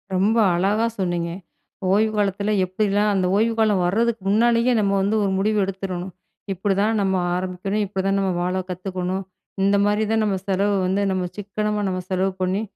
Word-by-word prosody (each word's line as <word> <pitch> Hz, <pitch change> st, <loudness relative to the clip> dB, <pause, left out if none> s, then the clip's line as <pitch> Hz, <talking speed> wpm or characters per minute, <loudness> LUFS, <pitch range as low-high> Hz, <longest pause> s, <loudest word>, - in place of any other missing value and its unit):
ரொம்ப 210 Hz, +5 st, +2 dB, 0.2 s
அழகா 205 Hz, +6 st, +1 dB
சொன்னீங்க. 175 Hz, -2 st, -1 dB, 0.6 s
ஓய்வு 215 Hz, +2 st, +3 dB
காலத்துல 200 Hz, +1 st, 0 dB
எப்படி 185 Hz, +4 st, -1 dB
எல்லாம், 205 Hz, +1 st, +2 dB
அந்த 185 Hz, -2 st, +1 dB
ஓய்வு 225 Hz, +2 st, +2 dB
காலம் 210 Hz, -4 st, +3 dB
வர்துக்கு 230 Hz, +3 st, +1 dB
முன்னாலயே 235 Hz, +3 st, +3 dB
நம்ம 200 Hz, -1 st, +1 dB
வந்து 205 Hz, +3 st, +1 dB
ஒரு 195 Hz, -, 0 dB
முடிவு 215 Hz, +2 st, +1 dB
எடுத்துரணும். 190 Hz, -1 st, -4 dB, 0.4 s
இப்படித்தான் 205 Hz, +3 st, 0 dB
நம்ம 190 Hz, -1 st, +1 dB, 0.2 s
ஆரம்பிக்கணும், 185 Hz, +3 st, -2 dB
இப்படித்தான் 195 Hz, 0 st, -1 dB
நம்ம 190 Hz, -1 st, 0 dB
வாழ 180 Hz, +1 st, -1 dB
கத்துக்கணும். 185 Hz, +1 st, -3 dB, 0.4 s
இந்த 200 Hz, +1 st, +3 dB
மாதிரிதான் 215 Hz, +1 st, +1 dB
நாம 195 Hz, -2 st, 0 dB
செலவு 200 Hz, +1 st, +1 dB
வந்து 190 Hz, +2 st, 0 dB
நம்ம 185 Hz, -1 st, -1 dB
சிக்கனமா 210 Hz, +1 st, -2 dB
நாம 185 Hz, 0 st, -2 dB
செலவு 190 Hz, +1 st, 0 dB
பண்ணி, 185 Hz, +3 st, 0 dB
195 Hz, 160 wpm, -22 LUFS, 185-210 Hz, 0.6 s, ஓய்வு